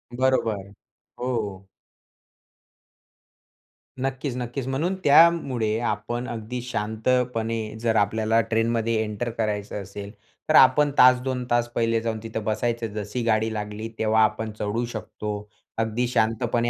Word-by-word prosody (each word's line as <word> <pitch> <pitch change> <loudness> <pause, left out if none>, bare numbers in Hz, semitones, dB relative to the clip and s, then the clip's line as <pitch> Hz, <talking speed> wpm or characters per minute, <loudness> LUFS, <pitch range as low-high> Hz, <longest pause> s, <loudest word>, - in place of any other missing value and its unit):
बरोबर. 115 -6 0 0.5
हो. 105 -6 -3 2.4
नक्कीच, 135 -1 -3
नक्कीच. 125 +1 -4
म्हणून 155 +8 -1
त्यामुळे 140 -8 +4
आपण 120 +2 -2
अगदी 120 +2 -5
शांतपणे 115 -1 -1
जर 115 -1 +1
आपल्याला 110 +2 +2
ट्रेनमध्ये 115 0 +1
एंटर 105 +2 -3
करायचं 105 -2 -2
असेल, 100 +1 -8 0.4
तर 155 - +4
आपण 145 +2 +6
तास 125 0 +7
2 130 -1 -2
तास 120 0 +3
पहिले 115 -1 +1
जाऊन 110 -1 -2
तिथं 110 -1 -4
बसायचं. 115 +2 -1
जशी 105 +3 -4
गाडी 110 -1 +1
लागली, 105 +1 -4
तेव्हा 110 0 +3
आपण 110 +1 0
चढू 105 +4 -1
शकतो 105 -1 -5 0.4
अगदी 115 +2 0
शांतपणे. 115 +1 +1
115 Hz, 120 wpm, -25 LUFS, 110-125 Hz, 2.4 s, तास